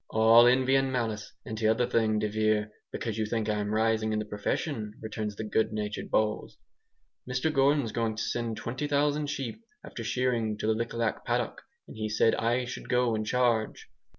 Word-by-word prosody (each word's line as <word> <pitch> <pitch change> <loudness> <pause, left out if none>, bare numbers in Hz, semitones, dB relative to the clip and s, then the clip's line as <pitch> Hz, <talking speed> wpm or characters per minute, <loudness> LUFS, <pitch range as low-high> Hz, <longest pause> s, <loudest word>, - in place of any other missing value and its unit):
"All 115 +2 +6
envy 130 +1 +3
and 135 0 +1
malice, 110 -5 -2
and 110 - -5
t'other 110 +2 +2
thing, 110 -2 +2
de 105 0 0
Vere, 110 0 +1 0.2
because 110 -2 -4
you 110 - 0
think 110 -1 -1
I'm 105 -1 -1
rising 110 0 +1
in - - 0
the 110 - -2
profession," 105 +2 -3
returns 110 -1 -4
the 110 - -5
good 110 0 +1
natured 105 -1 -4
Bowles, 110 0 0 0.7
"Mr 130 +5 0
Gordon's 135 -3 +3
going 115 -1 -1
to 110 - -3
send 115 -2 -2
20,000 145 +3 0
sheep, 135 - -4 0.2
after 115 - -7
shearing, 115 -2 0
to - - -4
the 110 - +3
Lik 115 +2 -3
Lak 115 -2 -1
paddock, - - -1 0.3
and - - -11
he 110 0 -3
said 105 +1 +3
I 120 +2 +1
should - - -7
go 125 -2 +2
in 110 0 -1
charge." 120 -2 0
110 Hz, 185 wpm, -29 LUFS, 110-125 Hz, 0.7 s, All